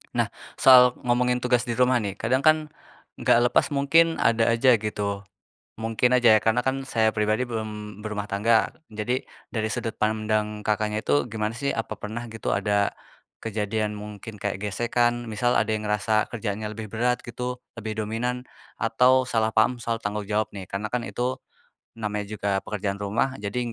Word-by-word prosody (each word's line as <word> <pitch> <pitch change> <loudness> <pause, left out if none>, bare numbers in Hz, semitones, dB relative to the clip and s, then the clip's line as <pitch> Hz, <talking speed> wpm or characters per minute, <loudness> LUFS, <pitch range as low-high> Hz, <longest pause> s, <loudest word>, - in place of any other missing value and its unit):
Nah, - - +1 0.2
soal 125 -2 +7
ngomongin 125 0 +1
tugas 125 -1 +2
di 120 - -1
rumah 125 0 +3
nih. 100 -3 -3
Kadang 120 +5 +1
kan 155 0 +7 0.6
nggak - - +4
lepas, - - +3
mungkin 165 +4 +4
ada 115 0 +3
aja 120 +1 +5
gitu. 100 -1 -3 0.5
Mungkin 115 +2 +1
aja 120 -3 +6
ya, - - +1
karena 110 +2 +2
kan 135 +1 -2
saya 110 -4 +2
pribadi 110 +2 +1
belum 105 -2 -6
berumah 105 -1 -3
tangga. 110 +3 +3 0.2
Jadi, 110 +4 -2 0.2
dari 110 -2 -1
sudut 115 -1 -3
pandang 110 0 0
Kakaknya 105 0 0
itu 145 +3 +2
gimana 110 0 -2
sih? 140 +2 -1
Apa 110 -2 -4
pernah 115 +3 -6
gitu 115 0 -3
ada, 105 -1 +1 0.5
kejadian, 105 -1 -2
mungkin 105 +1 -9
kayak 100 0 -3
gesekan, 120 +3 0
misal 120 +2 +1
ada - - +2
yang 110 - -2
ngerasa 105 +1 +1
kerjaannya 105 -2 -4
lebih 110 - -5
berat 125 +2 0
gitu, 125 +1 -4 0.2
lebih 110 -1 -6
dominan, 125 +4 -2 0.3
atau 125 +3 +3
salah 110 -3 +1
paham 115 +2 +2
soal 115 -1 -1
tanggung 105 -1 -4
jawab 105 +1 0
nih, 95 -2 -8
karena 105 +2 -4
kan 125 - +1
itu 125 +2 -3 0.6
namanya 105 -2 -3
juga 100 -2 -1
pekerjaan 100 -1 -4
rumah, 105 +6 0
jadi 115 +3 -3
110 Hz, 165 wpm, -25 LUFS, 105-120 Hz, 0.6 s, soal